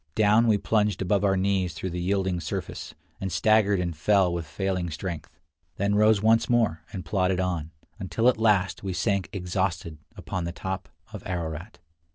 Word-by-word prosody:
Down 110 +2 +4
we 110 -2 +4
plunged 105 -2 +1
above 100 +1 +1
our 95 -1 +3
knees 95 -3 0
through 95 +2 -4
the 90 +1 -3
yielding 95 -1 0
surface, 85 - -5 0.2
and 95 -1 -3
staggered 105 0 +3
and 85 -2 -2
fell 95 +3 +3
with 85 -2 -4
failing 90 +2 -2
strength; 80 -1 -6 0.4
then 100 +1 0
rose 105 0 +4
once 115 +1 +4
more 115 -10 +2
and 90 -4 -6
plodded 90 +2 +1
on, 90 -4 -2 0.3
until 95 +4 0
at 125 - +4
last 100 -5 +2
we 95 -2 -3
sank 95 +1 0
exhausted 90 -4 -2 0.2
upon 90 -2 -4
the 85 - -3
top 95 -3 -5 0.2
of 105 - -6
Ararat. 85 +2 -4
95 Hz, 175 wpm, -26 LUFS, 85-105 Hz, 0.4 s, Down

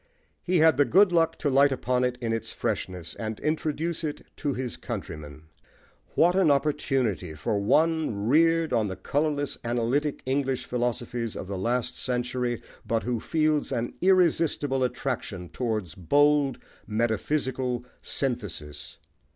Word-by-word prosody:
He 180 0 +1
had 160 -4 +5
the 145 - +5
good 185 - +5
luck 165 -2 +2
to 145 - 0
light 140 +1 +5
upon 125 -1 0
it 125 0 0
in 115 -1 -1
its 115 0 -3
freshness, 95 -6 -3
and 110 -1 -5
introduce 160 +2 -1
it 150 -2 -4
to 140 -3 -1
his 125 -1 -3
countrymen. 80 - -7 0.7
What 175 +2 +4
an 190 -4 +4
opportunity 135 - 0
for 100 +7 -1
one 150 -2 +2
reared 165 +3 +3
on 110 -3 +2
the 95 - -4
colourless 145 +2 -1
analytic 125 +5 0
English 135 -1 0
philosophies 120 -1 -2
of - - -5
the 100 +1 -5
last 120 +5 -1
century, 125 -1 -1 0.2
but 115 -1 -1
who 120 -1 -1
feels 155 +2 +1
an 120 -2 -2
irresistible 165 -7 +3
attraction 115 -8 -3
towards 110 -9 -2
bold 145 - +3 0.3
metaphysical 120 +3 -1 0.2
synthesis! 100 - -3
125 Hz, 135 wpm, -27 LUFS, 115-150 Hz, 0.7 s, had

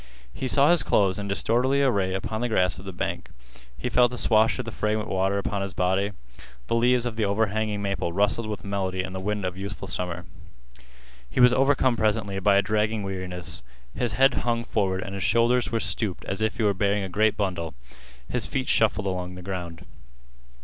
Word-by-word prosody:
He 130 - -3
saw 140 +4 +4
his 175 - +4
clothes 95 -1 +2
in 100 - -4
disorderly 125 +7 +1
array 100 -8 +1
upon 110 +3 -3
the 120 - 0
grass 90 -5 +1
of 95 - -11
the 95 - -5
bank. 90 - -4 0.5
He 60 - -3
felt 125 -1 +4
the 125 - -6
swash 110 -1 +3
of 125 - -4
the 115 - -5
fragrant 105 0 -1
water 95 0 0
upon 100 0 -2
his 100 -2 -4
body. 95 +3 +1 0.5
The - - -2
leaves 120 +1 +3
of 115 -2 -4
the 110 - +1
overhanging 105 0 0
maple 100 -3 -1
rustled 105 +4 +1
with 105 -1 -5
melody 95 -2 -2
in 95 - -6
the 95 - -4
wind 105 +1 -2
of 90 0 -2
youthful 100 0 -6
summer. 90 -2 -3 1.0
He - - -3
was 125 0 +7
overcome 135 -1 +3
presently 105 -3 0
by 100 +1 +4
a 100 - +4
dragging 105 +1 0
weariness. 90 -4 -4 0.3
His 120 -4 -2
head 135 +4 +4
hung 115 -1 0
forward 95 -4 -1
and 100 - -7
his 100 - -4
shoulders 120 +4 +2
were 115 - +1
stooped 95 0 -3
as 100 +3 -4
if 110 0 0
he 115 - 0
were 105 -1 +3
bearing 100 +1 +1
a - - -3
great 105 +3 +1
bundle. 90 -7 -2 0.5
His - - -2
feet 130 -1 -2
shuffled 105 -2 +2
along 90 -1 -3
the 90 - -9
ground. 90 -3 -6
100 Hz, 205 wpm, -25 LUFS, 95-115 Hz, 1.0 s, was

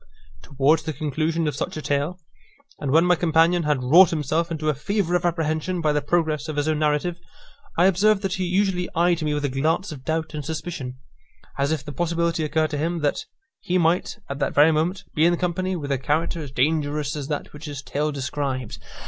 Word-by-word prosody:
Towards 140 +3 +2
the 155 - -4
conclusion 155 +3 -1
of 150 - -1
such 155 - -4
a - - -4
tale, 145 +5 -1 0.6
and 145 - -3
when 160 +5 +5
my 180 - +5
companion 165 +1 +3
had 150 -5 0
wrought 165 +8 +7
himself 160 +2 -1
into 155 -2 -3
a 155 - +3
fever 180 +5 -1
of 175 0 +1
apprehension 165 +1 -1
by 155 -2 +1
the 150 - +1
progress 155 0 0
of 155 - -4
his 145 +1 0
own 155 -1 +1
narrative, 155 +3 0 0.6
I 175 - +5
observed 195 +2 +3
that 190 -2 -1
he 190 -2 -1
usually 185 0 0
eyed 170 0 +2
me 150 -1 0
with 145 0 -1
a - - 0
glance 155 +8 0
of 135 -4 -9
doubt 160 +2 -2
and 150 -1 -4
suspicion, 155 -5 -5 0.6
as 140 +2 +1
if 150 -3 -2
the 150 - -6
possibility 170 +2 0
occurred 155 +1 0
to 145 - -2
him, 165 +2 -1
that 145 -1 0 0.3
he 180 - 0
might, 170 +3 +1
at 140 0 -5
that - - -1
very 150 +3 +6
moment, 165 +5 0
be 155 - +2
in 175 0 +2
company 185 +2 -1
with 145 -4 -4
a 135 - +1
character 160 +4 -1
as 145 - -6
dangerous 145 +2 0
as 145 -2 -4
that 150 -1 -4
which 150 +2 -9
his 145 -2 -6
tale 150 +2 -1
described. 135 -3 -3
155 Hz, 215 wpm, -23 LUFS, 145-170 Hz, 0.6 s, wrought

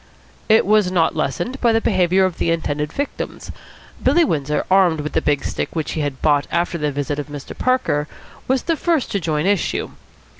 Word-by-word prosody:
It 220 +1 +5
was 210 -2 +3
not 170 -3 +2
lessened 250 +10 -2
by 235 - +4
the 225 - +3
behaviour 185 -3 +2
of 185 -3 -3
the - - +1
intended 150 -3 -1
victims. 285 - -5 0.5
Billy 345 -1 +4
Windsor, 150 - -1
armed 180 -5 +4
with 150 - -5
the 160 - +1
big 145 -2 0
stick - - -3
which 160 -2 -2
he 155 - -2
had 140 -3 -4
bought 145 -2 +3
after 170 0 -1
the 150 -1 0
visit 145 +1 -3
of 145 - -5
Mr. 145 -2 -8
Parker, 255 - 0 0.4
was 265 -1 +1
the 330 - 0
first 330 -5 0
to 200 - 0
join 155 -2 -1
issue. 200 -2 0
170 Hz, 195 wpm, -20 LUFS, 150-210 Hz, 0.5 s, It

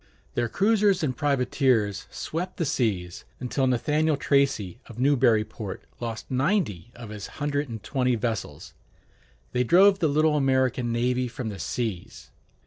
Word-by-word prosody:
Their 120 -1 0
cruisers 200 - +2
and 130 -4 0
privateers 125 -6 +1
swept 180 +3 -5
the 165 - 0
seas, 100 - -1 0.2
until 130 +1 0
Nathaniel 150 +5 +1
Tracy 140 -9 +1
of 115 - -12
Newburyport 115 -6 +1 0.2
lost 115 0 -5
ninety 130 - 0
of 115 -2 -9
his 105 -2 -7
hundred 145 -1 -1
and 110 -3 -7
twenty 125 -3 +1
vessels. 95 -7 -4 0.8
They 125 0 +1
drove 190 - +5
the 160 - +2
little 155 +1 +3
American 130 -3 +1
navy 125 +2 0
from 120 -1 -5
the 100 -2 -7
seas. 105 -1 -4
125 Hz, 135 wpm, -26 LUFS, 110-145 Hz, 0.8 s, drove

